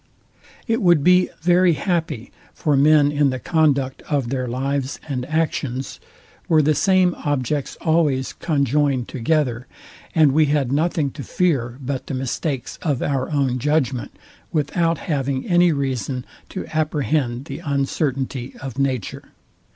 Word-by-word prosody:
It 230 Hz, +1 st, +1 dB
would 175 Hz, -6 st, +4 dB
be 180 Hz, +2 st, +5 dB
very 175 Hz, +1 st, +4 dB
happy 155 Hz, -, -2 dB, 0.2 s
for 150 Hz, -2 st, +1 dB
men 145 Hz, +1 st, +5 dB
in 145 Hz, -1 st, +2 dB
the 130 Hz, -, -2 dB
conduct 140 Hz, -2 st, +1 dB
of 140 Hz, -5 st, 0 dB
their 130 Hz, -1 st, -2 dB
lives 135 Hz, +2 st, -2 dB
and 130 Hz, -4 st, -3 dB
actions, 140 Hz, -5 st, -2 dB, 0.5 s
were 155 Hz, -2 st, +5 dB
the 155 Hz, +2 st, +3 dB
same 185 Hz, +1 st, +3 dB
objects 145 Hz, 0 st, -1 dB
always 155 Hz, -5 st, +1 dB
conjoined 140 Hz, -4 st, 0 dB
together, 125 Hz, -2 st, -1 dB, 0.5 s
and, 155 Hz, -4 st, +5 dB
we 155 Hz, +3 st, +4 dB
had 140 Hz, -3 st, +1 dB
nothing 150 Hz, -1 st, +1 dB
to 140 Hz, -, -8 dB
fear 130 Hz, -10 st, 0 dB
but 135 Hz, -1 st, -4 dB
the 135 Hz, -, -3 dB
mistakes 130 Hz, +1 st, -3 dB
of 145 Hz, -7 st, -1 dB
our 135 Hz, -2 st, -1 dB
own 135 Hz, -4 st, +1 dB
judgment, 140 Hz, -3 st, -1 dB, 0.3 s
without 165 Hz, +2 st, +1 dB
having 135 Hz, -4 st, -2 dB
any 175 Hz, -1 st, +4 dB
reason 135 Hz, -2 st, -2 dB, 0.2 s
to 190 Hz, -, -5 dB
apprehend 145 Hz, -5 st, 0 dB
the -, -, -6 dB
uncertainty 135 Hz, -2 st, -2 dB
of 135 Hz, -1 st, -6 dB
nature. 130 Hz, -6 st, -2 dB
140 Hz, 135 wpm, -21 LUFS, 130-155 Hz, 0.5 s, be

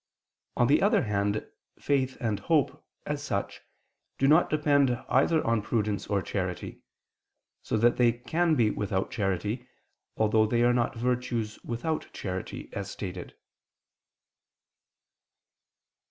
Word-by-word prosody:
On 120 Hz, -, +4 dB
the 140 Hz, +5 st, +4 dB
other 200 Hz, -6 st, +3 dB
hand 105 Hz, -1 st, -1 dB, 0.3 s
faith 130 Hz, -2 st, 0 dB
and 110 Hz, -4 st, -1 dB
hope, 155 Hz, -6 st, +1 dB, 0.2 s
as -, -, -3 dB
such, -, -, -3 dB, 0.6 s
do 135 Hz, -, +2 dB
not 155 Hz, +4 st, +5 dB
depend 145 Hz, -3 st, +3 dB, 0.2 s
either 160 Hz, -2 st, +3 dB
on 115 Hz, -1 st, +2 dB
prudence 105 Hz, -1 st, -1 dB
or 100 Hz, -2 st, 0 dB
charity; -, -, -4 dB, 0.8 s
so -, -, -1 dB
that 120 Hz, +2 st, +3 dB
they 120 Hz, -1 st, +5 dB
can 160 Hz, +8 st, 0 dB
be 115 Hz, -5 st, +3 dB
without 95 Hz, -2 st, -2 dB
charity, 105 Hz, +5 st, -2 dB, 0.5 s
although 110 Hz, 0 st, +3 dB
they 120 Hz, +2 st, +2 dB
are 120 Hz, 0 st, +4 dB
not 120 Hz, +1 st, 0 dB
virtues 120 Hz, -2 st, -2 dB
without 155 Hz, +7 st, -3 dB
charity, 95 Hz, -2 st, -5 dB
as 100 Hz, -1 st, -4 dB
stated. 90 Hz, -3 st, -7 dB
120 Hz, 125 wpm, -28 LUFS, 105-135 Hz, 0.8 s, not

